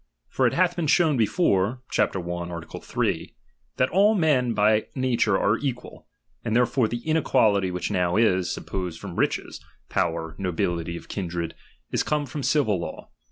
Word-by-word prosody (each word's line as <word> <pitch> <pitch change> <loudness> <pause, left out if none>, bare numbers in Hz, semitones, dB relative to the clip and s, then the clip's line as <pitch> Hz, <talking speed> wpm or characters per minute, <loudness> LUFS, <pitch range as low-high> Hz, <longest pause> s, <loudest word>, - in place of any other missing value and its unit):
For - - +2
it - - 0
hath 175 0 +2
been 165 -2 -1
showed 155 -3 +3
before 115 - +1
(Chap. - - +1
i. - - -1
Art. 85 -1 -6
3) - - -2 0.4
that 130 - +2
all 205 +5 +4
men 135 - +2
by 105 +1 +3
nature 120 -6 +2
are 105 +3 +2
equal; 125 -4 -5 0.4
and 110 -1 -1
therefore 125 0 +3
the 120 +5 -5
inequality 110 - +3
which 90 +3 -3
now 90 -3 +1
is, 95 -5 +2
suppose 90 -4 -4
from - - -8
riches, - - -1 0.3
power, 80 -1 -1
nobility 85 -2 -2
of - - -12
kindred, 85 -3 -4 0.4
is - - +1
come 150 -1 0
from 145 +2 -5
the 125 - -1
civil 130 - +2
law. 85 - -7
110 Hz, 165 wpm, -25 LUFS, 90-135 Hz, 0.4 s, all